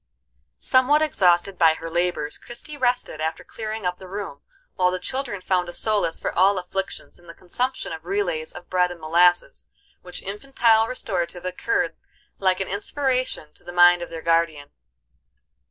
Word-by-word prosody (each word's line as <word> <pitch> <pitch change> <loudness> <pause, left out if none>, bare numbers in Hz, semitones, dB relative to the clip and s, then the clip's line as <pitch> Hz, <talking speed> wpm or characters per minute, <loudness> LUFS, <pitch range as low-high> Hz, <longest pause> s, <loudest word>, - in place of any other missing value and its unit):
Somewhat 275 +4 +3
exhausted 185 - +2
by 160 -2 +6
her 165 - -7
labors, 170 -3 -1
Christie 240 +6 -8
rested, 245 - 0
after 160 +1 -2
clearing 220 -2 -5
up 180 0 -1
the 190 - -10
room, 190 -7 -6 0.3
while 180 -1 +2
the 185 - -1
children 235 +1 -3
found 180 -1 0
a - - -5
solace 205 -3 +1
for - - -3
all 195 +2 +4
afflictions 190 +1 -5
in 175 - -20
the 170 - -11
consumption 250 +4 -3
of 160 0 -8
relays 175 -4 -1
of 175 - -11
bread 180 -1 +2
and 175 -1 -9
molasses, 165 - +2 0.3
which 180 0 -8
infantile 225 +1 +2
restorative 180 -7 -3
occurred 290 - -1 0.4
like 185 -1 +2
an 195 - -2
inspiration 255 - -2
to - - -15
the 175 - -8
mind 175 0 +6
of 175 - -5
their 165 -1 -7
guardian. 165 -4 +1
180 Hz, 165 wpm, -23 LUFS, 170-220 Hz, 0.4 s, by